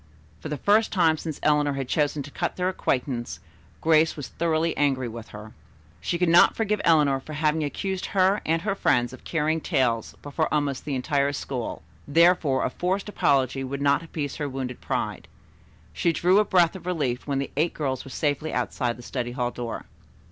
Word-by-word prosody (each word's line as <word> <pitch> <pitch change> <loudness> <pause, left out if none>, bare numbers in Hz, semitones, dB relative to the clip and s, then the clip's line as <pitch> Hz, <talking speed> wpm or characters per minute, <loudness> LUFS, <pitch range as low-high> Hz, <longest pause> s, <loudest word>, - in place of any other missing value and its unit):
For - - -7
the 150 - -3
first 210 +7 +3
time 165 -5 +3
since 155 -2 -5
Eleanor 150 -1 +3
had 135 -2 -3
chosen 145 0 0
to 145 - -11
cut - - -2
their 180 0 0
acquaintance 125 -8 -2 0.4
Grace 160 0 +3
was 145 - -6
thoroughly 165 0 0
angry 135 -3 +1
with 115 -1 -8
her. 105 +1 -11 0.5
She 170 - -2
could 180 0 +1
not 170 +1 +6
forgive 210 -2 0
Eleanor 150 -5 +4
for 155 +3 -10
having 155 +1 +1
accused 190 +6 -3
her 195 +1 +2
and 165 +1 0
her 205 -1 0
friends 120 -10 +1
of 130 - -12
carrying 160 0 0
tales 125 - 0
before 145 +2 -1
almost 145 -3 -1
the 145 -2 -2
entire 140 +2 0
school; 130 -4 -4 0.2
therefore 160 -3 +4
a - - -1
forced 190 +3 -2
apology 135 - +1
would 135 +1 -4
not 140 +1 +3
appease 155 -3 -5
her 145 -2 -2
wounded 130 -2 -5
pride. - - -3 0.7
She 170 - +1
drew 180 +4 +3
a 210 - +3
breath 180 -2 +3
of 180 -2 -9
relief 145 -9 -1
when 140 -1 0
the 140 - -3
eight 160 +4 0
girls 135 -4 -2
were - - -11
safely 145 +2 -1
outside 120 -3 -1
the 120 - -11
study 120 -1 -4
hall 125 -1 -1
door. 120 -2 -5
150 Hz, 190 wpm, -25 LUFS, 130-165 Hz, 0.7 s, not